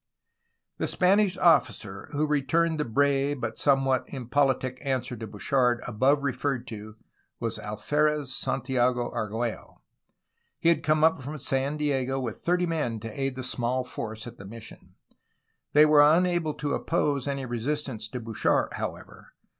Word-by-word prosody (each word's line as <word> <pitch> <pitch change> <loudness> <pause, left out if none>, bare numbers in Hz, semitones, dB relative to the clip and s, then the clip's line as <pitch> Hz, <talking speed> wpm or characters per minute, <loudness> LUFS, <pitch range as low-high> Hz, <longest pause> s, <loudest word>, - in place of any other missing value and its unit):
The - - 0
Spanish 190 0 +3
officer 105 - +2
who 150 +1 0
returned 155 +3 +1
the 150 - 0
brave 140 +3 +1
but 115 -2 -4
somewhat 135 -2 +3
impolitic 130 0 0
answer 130 -3 -2
to 110 -1 -7
Bouchard 120 +4 +1
above 130 +5 +2
referred 130 -1 -1
to 110 -1 -8 0.4
was 115 -1 -2
Alferez 145 +7 0
Santiago 125 -2 0
Argiiello. 110 +2 -3 0.8
He 165 - +3
had 165 -2 +3
come 155 0 +2
up 160 -4 +4
from 145 +4 -6
San 135 +2 -1
Diego 135 -3 0
with 120 -4 -5
thirty 180 +1 +1
men 150 -10 -2
to 115 - -5
aid 135 -1 -1
the 130 - -5
small 125 +1 -1
force 110 -3 -6
at 120 0 -10
the 95 - -9
mission. 115 +2 -12 0.8
They 150 +1 +8
were 150 -1 +6
unable 165 +1 +3
to 145 -1 -2
oppose 140 -2 0
any 140 -1 -2
resistance 120 -1 -3
to 125 +3 -6
Bouchard, 115 -2 0
however. - - -7
135 Hz, 145 wpm, -27 LUFS, 120-150 Hz, 0.8 s, They